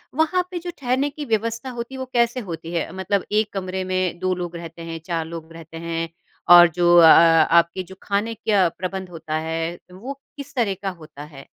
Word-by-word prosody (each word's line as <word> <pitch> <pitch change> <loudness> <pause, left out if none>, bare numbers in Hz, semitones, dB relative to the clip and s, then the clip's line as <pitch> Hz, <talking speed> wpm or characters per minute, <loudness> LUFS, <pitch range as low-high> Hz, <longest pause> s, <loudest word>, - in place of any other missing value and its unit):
वहाँ 320 +4 +2
पे 355 - -3
जो 350 +1 -6
ठहरने 260 +2 0
की 295 +1 -7
व्यवस्था 230 +2 -2
होती 240 +1 -6
है, 265 - -7
वो 260 - -3
कैसे 240 +1 +2
होती 165 -6 -7
है? 170 - -2
मतलब 190 +1 -1
एक 210 0 +1
कमरे 190 -1 -3
में 185 -1 -1
2 185 0 0
लोग 175 -1 -5
रहते 170 0 -9
हैं, 165 0 -6
4 165 -2 -2
लोग 165 0 -9
रहते 165 0 -11
हैं 165 0 -3 0.5
और 175 0 +10
जो 175 -1 +4
अ, 170 - +9
अ, 165 0 +7
आपके 170 +2 +3
जो 190 +1 -13
खाने 205 +3 -1
क्या 205 -4 +2
प्रबंध 185 +2 -5
होता 160 -2 -5
है, 165 +1 -3
वो 220 +10 -7 0.2
किस 280 - -9
तरह 230 -6 +1
का 195 - -2
होता 155 -5 -11
है? 145 -2 -12
185 Hz, 210 wpm, -22 LUFS, 165-225 Hz, 0.5 s, और